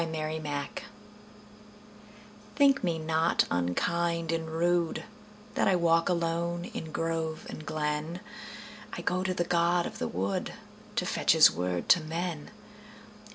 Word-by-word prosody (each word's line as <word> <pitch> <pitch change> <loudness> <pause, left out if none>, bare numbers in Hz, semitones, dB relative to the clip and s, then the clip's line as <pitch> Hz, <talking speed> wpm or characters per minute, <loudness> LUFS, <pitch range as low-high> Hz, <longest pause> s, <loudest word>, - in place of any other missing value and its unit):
The 165 - -1 0.3
Apology 145 -2 -4 1.7
THINK 275 -3 +4
me 170 -3 +1
not 160 +1 +2
unkind 165 - 0
and 165 -1 -2
rudeThat 170 +1 0 0.6
I 190 - +4
walk 165 -1 +3
alone 170 0 -1
in 160 - -5
grove 165 -1 -2
and 155 - -7
glen;I 155 +5 -5
go 180 +1 0
to 185 -1 -1
the 175 - +1
god 175 0 +2
of - - -6
the 80 - -2
woodTo 95 +3 -4
fetch - - +3
his - - +8
word 90 +2 -2
to 185 - +7
men. 165 0 -4
165 Hz, 120 wpm, -29 LUFS, 155-175 Hz, 1.7 s, his